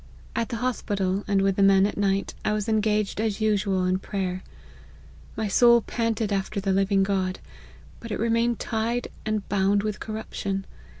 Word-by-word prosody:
At 230 Hz, -1 st, -1 dB
the 240 Hz, -, -3 dB
hospital, 205 Hz, -5 st, -1 dB
and 200 Hz, -1 st, +2 dB
with 195 Hz, -1 st, +1 dB
the -, -, +2 dB
men 195 Hz, 0 st, +6 dB
at 205 Hz, -, -2 dB
night, 195 Hz, -1 st, 0 dB
I 215 Hz, -, +1 dB
was 210 Hz, -1 st, -2 dB
engaged, 215 Hz, -1 st, +1 dB
as 220 Hz, -2 st, -1 dB
usual, 200 Hz, -3 st, +1 dB
in 185 Hz, 0 st, +1 dB
prayer: 185 Hz, -2 st, -3 dB, 1.0 s
my 220 Hz, -1 st, -1 dB
soul 235 Hz, +4 st, +6 dB
panted 225 Hz, -2 st, -1 dB
after 195 Hz, +1 st, -2 dB
the 195 Hz, -1 st, 0 dB
living 195 Hz, 0 st, +2 dB
God, 190 Hz, -1 st, 0 dB, 0.6 s
but 230 Hz, -, -9 dB
it 210 Hz, -, -2 dB
remained 230 Hz, +1 st, +1 dB
tied 230 Hz, +2 st, -2 dB, 0.2 s
and 215 Hz, -2 st, -1 dB
bound 200 Hz, +1 st, +2 dB
with 210 Hz, -1 st, -3 dB
corruption. 200 Hz, -3 st, -4 dB
205 Hz, 170 wpm, -25 LUFS, 195-220 Hz, 1.0 s, men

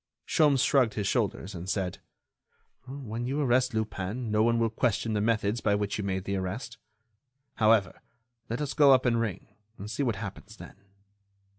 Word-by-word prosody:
Sholmes 145 Hz, -4 st, +3 dB
shrugged 130 Hz, -6 st, +3 dB
his 105 Hz, -, -2 dB
shoulders 100 Hz, -2 st, -1 dB
and 90 Hz, +1 st, -7 dB
said: 95 Hz, -3 st, -2 dB, 0.9 s
"When 120 Hz, -3 st, -5 dB
you 140 Hz, +3 st, -1 dB
arrest 130 Hz, -3 st, +2 dB
Lupin 110 Hz, +2 st, -3 dB
no 105 Hz, 0 st, +2 dB
one 115 Hz, +1 st, +3 dB
will 115 Hz, -1 st, +1 dB
question 110 Hz, -1 st, 0 dB
the 105 Hz, -, 0 dB
methods 110 Hz, 0 st, 0 dB
by 100 Hz, -, +2 dB
which 105 Hz, 0 st, -2 dB
you -, -, -2 dB
made 95 Hz, -1 st, -2 dB
the 100 Hz, 0 st, -2 dB
arrest. 110 Hz, +7 st, -5 dB, 0.8 s
However, 110 Hz, -2 st, +3 dB, 0.5 s
let 115 Hz, +5 st, -3 dB
us 145 Hz, -, -2 dB
go 145 Hz, -3 st, +6 dB
up 130 Hz, 0 st, +3 dB
and 115 Hz, -2 st, +2 dB
ring, 110 Hz, -5 st, -4 dB, 0.3 s
and 105 Hz, +2 st, -7 dB
see 145 Hz, -, -3 dB
what 120 Hz, -6 st, 0 dB
happens 100 Hz, +1 st, -8 dB
then." -, -, -12 dB
110 Hz, 175 wpm, -28 LUFS, 100-125 Hz, 0.9 s, go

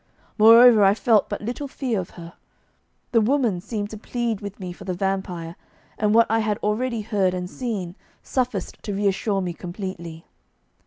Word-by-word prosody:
Moreover, 230 Hz, 0 st, +8 dB
I 195 Hz, +1 st, +5 dB
felt 220 Hz, -2 st, +2 dB
but 205 Hz, -, -4 dB
little 245 Hz, +6 st, -4 dB
fear 255 Hz, -5 st, -2 dB
of 185 Hz, -, -5 dB
her. 170 Hz, 0 st, -10 dB, 0.8 s
The 230 Hz, -, +4 dB
woman 230 Hz, -6 st, +1 dB
seemed 210 Hz, 0 st, -4 dB
to 215 Hz, -, -8 dB
plead 235 Hz, -2 st, -3 dB
with 200 Hz, 0 st, -8 dB
me 180 Hz, -2 st, -6 dB
for -, -, -12 dB
the 185 Hz, -, -3 dB
vampire, 180 Hz, -3 st, -3 dB, 0.4 s
and 210 Hz, 0 st, +1 dB
what 230 Hz, 0 st, +6 dB
I 225 Hz, +1 st, +1 dB
had 215 Hz, -2 st, 0 dB
already 230 Hz, +2 st, -1 dB
heard 200 Hz, -4 st, 0 dB
and 180 Hz, 0 st, -4 dB
seen 200 Hz, -5 st, -4 dB, 0.3 s
sufficed 255 Hz, -1 st, -3 dB
to 205 Hz, -3 st, -4 dB
reassure 200 Hz, 0 st, 0 dB
me 180 Hz, -2 st, -3 dB
completely. 175 Hz, -2 st, -7 dB
205 Hz, 170 wpm, -23 LUFS, 185-230 Hz, 0.8 s, Moreover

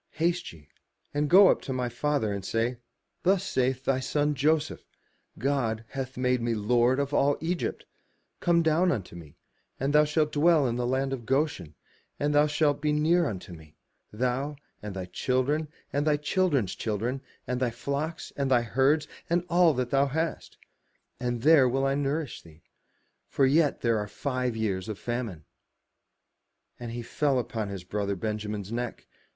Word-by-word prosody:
Haste 170 Hz, +2 st, 0 dB
ye, 75 Hz, -4 st, -16 dB, 0.5 s
and 145 Hz, 0 st, 0 dB
go 190 Hz, +2 st, +8 dB
up -, -, +2 dB
to -, -, -6 dB
my 125 Hz, -1 st, -1 dB
father, 120 Hz, -2 st, -1 dB
and 100 Hz, -1 st, -4 dB
say, 115 Hz, +4 st, -1 dB, 0.4 s
*Thus 190 Hz, +1 st, +2 dB
saith 130 Hz, -6 st, 0 dB
thy 135 Hz, -1 st, +2 dB
son 150 Hz, +3 st, 0 dB
Joseph, 155 Hz, +2 st, 0 dB, 0.5 s
*God 115 Hz, -4 st, -1 dB
hath 135 Hz, -1 st, -5 dB
made 125 Hz, -1 st, +1 dB
me 115 Hz, 0 st, 0 dB
Lord 120 Hz, +4 st, +2 dB
of 140 Hz, 0 st, -2 dB
all 145 Hz, 0 st, +3 dB
Egypt: 170 Hz, +2 st, -3 dB, 0.5 s
come 170 Hz, -1 st, +3 dB
down 165 Hz, +3 st, +3 dB
unto 95 Hz, -, -4 dB
me, 80 Hz, -4 st, -12 dB, 0.4 s
and 135 Hz, +2 st, 0 dB
thou 150 Hz, 0 st, +6 dB
shalt 150 Hz, 0 st, +1 dB
dwell 155 Hz, -1 st, +4 dB
in 120 Hz, -2 st, 0 dB
the 120 Hz, 0 st, -1 dB
land 135 Hz, +1 st, 0 dB
of 120 Hz, -4 st, -6 dB
Goshen, 135 Hz, -, -1 dB, 0.4 s
and 145 Hz, +1 st, +1 dB
thou 145 Hz, +1 st, +5 dB
shalt 145 Hz, -1 st, +1 dB
be 150 Hz, -, +1 dB
near 160 Hz, +3 st, +3 dB
unto 95 Hz, -5 st, -6 dB
me, 80 Hz, -2 st, -14 dB, 0.4 s
thou, 130 Hz, +6 st, -1 dB, 0.3 s
and 105 Hz, -2 st, -6 dB
thy 95 Hz, -1 st, -4 dB
children, 130 Hz, -, 0 dB, 0.3 s
and 145 Hz, +2 st, 0 dB
thy 150 Hz, -1 st, +3 dB
children's 150 Hz, -, +1 dB
children, 115 Hz, +5 st, -2 dB, 0.2 s
and 125 Hz, 0 st, -2 dB
thy 125 Hz, -1 st, +1 dB
flocks, 140 Hz, +7 st, -4 dB
and 140 Hz, -1 st, -1 dB
thy 120 Hz, -2 st, +4 dB
herds, 135 Hz, +6 st, +2 dB, 0.2 s
and 175 Hz, +1 st, +1 dB
all 175 Hz, 0 st, +5 dB
that 125 Hz, -1 st, -2 dB
thou 140 Hz, +1 st, +3 dB
hast: 160 Hz, +4 st, -3 dB, 0.6 s
and 120 Hz, -1 st, -2 dB
there 145 Hz, -4 st, +6 dB
will 135 Hz, +2 st, 0 dB
I 135 Hz, -, +2 dB
nourish 145 Hz, 0 st, -2 dB
thee; 80 Hz, -1 st, -18 dB, 0.6 s
for 135 Hz, -, +2 dB
yet 145 Hz, +2 st, +3 dB
there 115 Hz, -2 st, +2 dB
are 105 Hz, -, -3 dB
five 125 Hz, 0 st, -2 dB
years 100 Hz, -3 st, -2 dB
of 105 Hz, -, -4 dB
famine*. 115 Hz, -, -4 dB, 1.3 s
And 120 Hz, -1 st, -6 dB
he 120 Hz, 0 st, -5 dB
fell 140 Hz, +2 st, 0 dB
upon 115 Hz, -4 st, -3 dB
his 95 Hz, -3 st, -6 dB
brother 100 Hz, +1 st, -2 dB
Benjamin's 105 Hz, 0 st, -4 dB
neck. 120 Hz, 0 st, -4 dB
130 Hz, 170 wpm, -28 LUFS, 115-150 Hz, 1.3 s, go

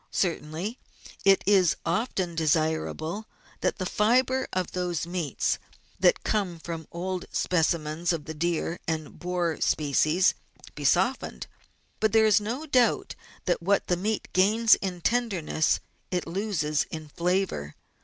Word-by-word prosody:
Certainly 175 Hz, +5 st, -2 dB, 0.5 s
it 195 Hz, -1 st, +5 dB
is 190 Hz, -4 st, +4 dB
often 185 Hz, -2 st, -1 dB
desirable 160 Hz, +4 st, 0 dB, 0.3 s
that -, -, 0 dB
the 185 Hz, -, -3 dB
fibre 255 Hz, +7 st, +2 dB
of 185 Hz, -2 st, -2 dB
those 175 Hz, -3 st, -2 dB
meats 170 Hz, -3 st, -1 dB, 0.4 s
that -, -, +4 dB
come 195 Hz, -5 st, -1 dB
from 165 Hz, -1 st, -6 dB
old 180 Hz, +1 st, -3 dB
specimens 165 Hz, -1 st, 0 dB
of 160 Hz, -4 st, -3 dB
the 160 Hz, -, -5 dB
deer 170 Hz, +2 st, -1 dB
and 160 Hz, -2 st, -3 dB
boar 175 Hz, -2 st, -1 dB
species 155 Hz, +4 st, +3 dB, 0.4 s
be 145 Hz, -, -6 dB
softened, 190 Hz, -, +1 dB, 0.5 s
but 220 Hz, -2 st, +1 dB
there 220 Hz, -1 st, +6 dB
is 210 Hz, -1 st, +5 dB
no 240 Hz, +9 st, -3 dB
doubt 255 Hz, -5 st, +2 dB, 0.3 s
that 175 Hz, -, +1 dB
what 200 Hz, +4 st, +2 dB
the 180 Hz, -, +1 dB
meat 210 Hz, +4 st, -2 dB
gains 215 Hz, +4 st, +5 dB
in 180 Hz, -3 st, -1 dB
tenderness 195 Hz, -9 st, +1 dB, 0.3 s
it 180 Hz, -1 st, -1 dB
loses 170 Hz, -5 st, -1 dB
in 155 Hz, -1 st, -6 dB
flavour. 175 Hz, -, -1 dB
180 Hz, 135 wpm, -27 LUFS, 160-205 Hz, 0.5 s, there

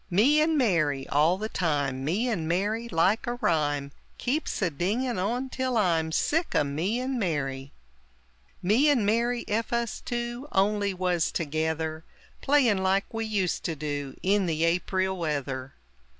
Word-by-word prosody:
"Me 250 Hz, -, +4 dB
and 315 Hz, 0 st, +2 dB
Mary!" 155 Hz, -, +1 dB
all 155 Hz, +5 st, +3 dB
the 215 Hz, +2 st, -3 dB
time, 145 Hz, -9 st, -1 dB
"Me 190 Hz, -, 0 dB
and 185 Hz, -10 st, -1 dB
Mary!" 205 Hz, +7 st, 0 dB
like 190 Hz, +7 st, +2 dB
a 240 Hz, -, -1 dB
rhyme 145 Hz, -9 st, 0 dB, 0.3 s
Keeps 285 Hz, +6 st, -1 dB
a 175 Hz, -, +1 dB
dinging 215 Hz, -, -1 dB
on 240 Hz, +7 st, -1 dB
till 260 Hz, -2 st, -1 dB
I'm 165 Hz, -6 st, +2 dB
Sick 325 Hz, -, 0 dB
o' -, -, +4 dB
"Me 165 Hz, +11 st, -1 dB
and 255 Hz, 0 st, -2 dB
Mary!" 140 Hz, -7 st, -2 dB, 0.9 s
"Me 230 Hz, +11 st, +4 dB
and 250 Hz, -8 st, +3 dB
Mary! 235 Hz, +3 st, +1 dB
Ef 225 Hz, +2 st, -1 dB
us 235 Hz, -1 st, -1 dB
two 240 Hz, +3 st, -4 dB
Only 200 Hz, +1 st, +2 dB
was 180 Hz, -3 st, 0 dB
together 160 Hz, 0 st, -2 dB, 0.4 s
Playin' 260 Hz, -8 st, +3 dB
like 190 Hz, +3 st, 0 dB
we 225 Hz, 0 st, -2 dB
used 200 Hz, -5 st, -1 dB
to 165 Hz, -, -1 dB
do 145 Hz, -2 st, -4 dB
In 195 Hz, 0 st, +2 dB
the 160 Hz, -1 st, 0 dB
Aprile 185 Hz, +2 st, 0 dB
weather!" 140 Hz, -6 st, -3 dB
190 Hz, 155 wpm, -27 LUFS, 160-235 Hz, 0.9 s, Me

